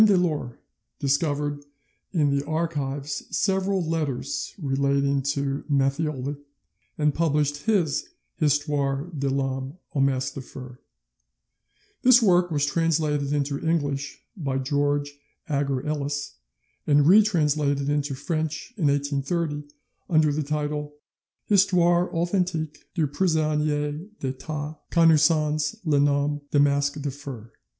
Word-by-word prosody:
Delort 175 - +2 0.4
discovered 145 0 0 0.5
in 145 -6 +2
the 140 - 0
archives 145 -3 -2 0.2
several 190 -2 +1
letters 150 -5 -2
relating 140 -2 +1
to 140 0 -1
Matthioli, 140 0 0 0.6
and 150 -1 +2
published 150 0 0
his 180 -10 +1 0.3
Histoire 145 0 0
de 140 -1 -1
l'Homme 135 +2 -2 0.2
au 145 - -1
Masque 135 -1 +1
de 135 - -6
Fer 130 0 -10
(8vo). 125 - -14 1.2
This 250 -1 +7
work 180 -5 +4
was 145 -3 +1
translated 150 -3 0
into 145 -1 -1
English 145 -4 -2
by 140 -8 -2
George 145 +1 -1 0.3
Agar 140 -2 -1
Ellis, 145 -1 -2 0.5
and 145 -1 +5
retranslated 150 -8 +3
into 145 -1 0
French 155 - -3
in 165 -7 +2
1830, 145 +2 -1 0.4
under 155 -3 +3
the 155 - -1
title 150 0 -3 0.5
'Histoire 180 -3 +3
authentique 170 -3 -1
du 165 -4 +2
Prisonnier 150 -2 0 0.2
d'Etat, 145 +3 -5
connu 165 -2 +5
sons 150 +2 +2
le 150 -3 +3
Nom 145 +1 +1
de 145 - +2
Masque 140 0 +2
de 145 -1 -3
Fer'. 130 -5 -9
145 Hz, 115 wpm, -25 LUFS, 140-160 Hz, 1.2 s, This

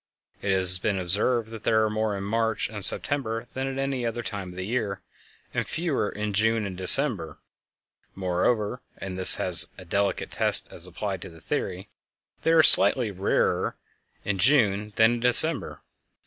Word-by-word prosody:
It 100 - -2
has 90 -1 +4
been 100 +1 -2
observed 110 +6 0
that 115 -2 -10
there 110 -1 0
are - - -2
more 110 -1 -3
in 100 - -7
March 110 +1 -2
and 105 -2 -7
September 115 0 +2
than 135 +1 -5
at 135 0 -6
any 135 -2 -4
other 120 0 -5
time 100 -5 -7
of 90 - -13
the 95 0 -6
year, 105 -4 -4 0.5
and - - -3
fewer 160 -10 -3
in 105 0 -6
June 110 +2 0
and 95 -2 -7
December; 95 - +1 0.8
moreover 105 +6 -2 0.2
(and 95 -1 -8
this 95 0 +5
is 90 -2 +7
a 95 - -13
delicate 100 +3 -3
test - - +1
as 85 - -9
applied 95 +1 -6
to 95 - -10
the 80 -1 -16
theory), 95 +4 -5 0.5
they - - -2
are 165 -1 +4
slightly 105 -1 +4
rarer 95 +1 -2 0.5
in 100 -2 -3
June 105 -4 +1
than 110 +1 +3
in 120 - -4
December. 125 +5 +4
105 Hz, 175 wpm, -24 LUFS, 95-120 Hz, 0.8 s, is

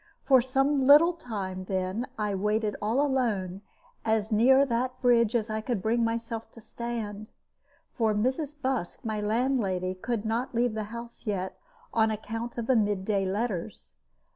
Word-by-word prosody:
For 265 -3 +6
some 270 +2 +1
little 300 +6 +7
time, 195 - -5
then, 190 +5 -2
I 210 -2 -1
waited 210 +2 0
all 220 +5 +1
alone, 210 -9 -1 0.4
as 220 0 0
near 260 +6 +5
that 255 0 -1
bridge 240 -2 +3
as 225 -2 +1
I 220 -1 -2
could 230 -1 -2
bring 230 +4 +1
myself 230 0 -3
to - - -12
stand, 220 -2 -5 0.6
for 220 -3 +1
Mrs. 265 +7 -1
Busk, 260 -10 -2
my 215 -1 -2
landlady, 210 -5 0
could 225 +3 -3
not 235 +3 -2
leave 240 -1 +2
the 215 -1 -3
house 235 +2 -9
yet, 190 -2 -3 0.3
on 220 -1 +3
account 225 +2 -4
of 235 - -2
the 260 - +3
mid 205 -3 +1
day 195 -2 +1
letters. 185 - -3
225 Hz, 160 wpm, -28 LUFS, 205-245 Hz, 0.6 s, little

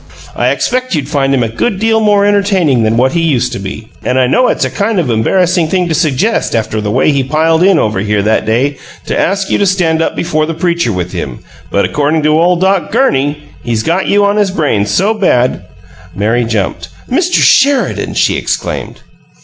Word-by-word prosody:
I - - +1
expect 255 -4 -1
you'd 145 -3 -2
find 140 -2 0
him 130 -3 +1
a - - -1
good 190 - -2
deal 225 +2 +1
more 205 -2 +2
entertaining 195 - +2
than 110 +1 +1
what 130 +2 +2
he 170 - 0
used 125 -7 0
to - - -5
be 100 +3 -7
and 125 - -1
I 130 - +3
know 250 - +2
it's - - 0
a - - -4
kind 215 +1 -1
of 145 -8 -1
embarrassing 175 +9 +1
thing 180 +1 0
to - - 0
suggest 160 - 0
after 110 -1 -2
the 105 - -3
way 130 +7 +2
he 140 -2 0
piled 160 +4 +1
in 190 -1 +4
over 105 -7 0
here 105 0 0
that 110 +1 0
day 130 +6 0 0.3
to - - -3
ask 195 +1 -1
you - - +1
to 200 - +2
stand 170 -4 +1
up - - -1
before 155 -2 -1
the 165 - -4
preacher 170 -5 0
with 90 -2 -3
him, 70 -9 -6 0.3
but 100 - +1
accordin' 150 +2 0
to 155 +1 +2
ole 180 +1 +3
Doc 190 -2 0
GURNEY, 145 - 0 0.2
he's 115 -2 -2
got 175 +4 0
you 205 0 +3
on 200 +1 +1
his 205 -2 +2
brain 145 - 0
so 195 - +1
bad 125 - 0 0.2
" 90 0 -22
Mary 115 +4 0
jumped. 110 -4 -3 0.2
"Mr. 350 +7 0
Sheridan!" 280 0 +2
she - - +1
exclaimed. - - -4
155 Hz, 215 wpm, -12 LUFS, 115-190 Hz, 0.3 s, in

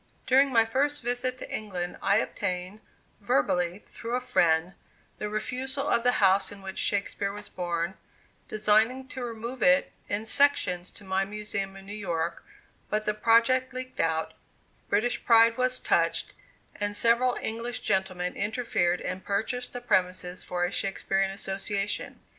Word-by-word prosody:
During 270 +2 +4
my 230 -2 +5
first 280 +4 0
visit 245 +1 -1
to - - -5
England 180 -5 -4
I 200 +1 +3
obtained, 185 0 -2 0.4
verbally, 180 0 0
through 235 +1 -3
a - - +1
friend, 170 -7 +2 0.5
the 210 - -3
refusal 260 +6 -2
of 235 - +3
the 245 +1 +3
house 195 -3 +4
in 200 -1 -11
which 190 0 -5
Shakespeare 200 0 0
was 210 +1 -8
born, 175 0 -2 0.5
designing 220 +5 +2
to 260 -3 -5
remove 235 +2 -6
it 275 0 +4 0.2
in 205 +2 -2
sections 210 -10 +3
to 210 - -13
my 190 0 0
Museum 205 -1 -4
in 195 0 -12
New 200 - -7
York; 170 -5 -3 0.5
but 215 0 0
the 210 - +1
project 235 +4 +3
leaked 255 0 -6
out, 160 -1 0 0.6
British 215 +4 +1
pride 230 -1 +6
was 255 +1 0
touched, - - +1 0.4
and 205 0 -1
several 235 +3 +3
English 230 +2 -3
gentlemen 185 -2 -1
interfered 205 -6 0
and 185 +1 -4
purchased 225 +5 -2
the 245 - -6
premises 180 -5 0
for 175 0 -1
a 175 - -3
Shakespearian 195 0 0
Association. 195 +1 -3
210 Hz, 150 wpm, -28 LUFS, 190-245 Hz, 0.6 s, pride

